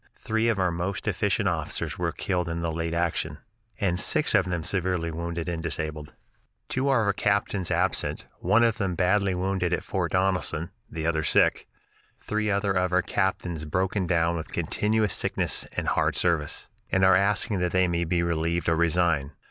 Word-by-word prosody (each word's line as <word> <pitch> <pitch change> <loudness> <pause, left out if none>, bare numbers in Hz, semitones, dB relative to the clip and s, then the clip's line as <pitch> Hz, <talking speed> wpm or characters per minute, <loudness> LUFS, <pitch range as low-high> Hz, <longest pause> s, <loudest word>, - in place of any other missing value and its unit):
Three 110 +1 0
of 115 - +1
our 90 -2 +1
most 90 +3 -3
efficient - - +1
officers - - -2
were - - 0
killed 90 -3 -2
in 85 0 -3
the 85 - -1
late 85 +1 -2
action, 85 0 -1 0.4
and 90 -3 0
six 155 +9 +3
of 95 -4 +4
them 85 -3 -2
severely 90 -2 -1
wounded 85 +1 -4
and 85 -2 -3
disabled. 75 -2 -4 0.5
Two 130 +2 0
of - - +4
our 110 -5 +2
captains 100 -2 0
absent; - - 0
one 115 +2 +3
of 115 0 +2
them 95 -4 -1
badly 95 +1 +2
wounded 90 -1 -1
at - - -1
Fort 90 -3 -2
Donelson, 95 -3 0 0.2
the 80 0 -5
other 80 -1 +1
sick. - - +2 0.5
Three 105 0 -2
other 100 0 +1
of 90 -1 +1
our 90 0 +3
captains 90 -5 -1
broken 95 +4 -1
down 85 -1 +2
with 80 - -7
continuous 105 -1 0
sickness - - -1
and - - -1
hard - - +1
service, 85 -4 0 0.2
and 95 0 +4
are 95 - +6
asking 100 +1 +1
that 90 -1 0
they 95 0 +3
may 85 0 0
be 85 +1 0
relieved 85 0 -1
or 80 - +3
resign. 80 -3 +1
90 Hz, 180 wpm, -26 LUFS, 85-95 Hz, 0.5 s, are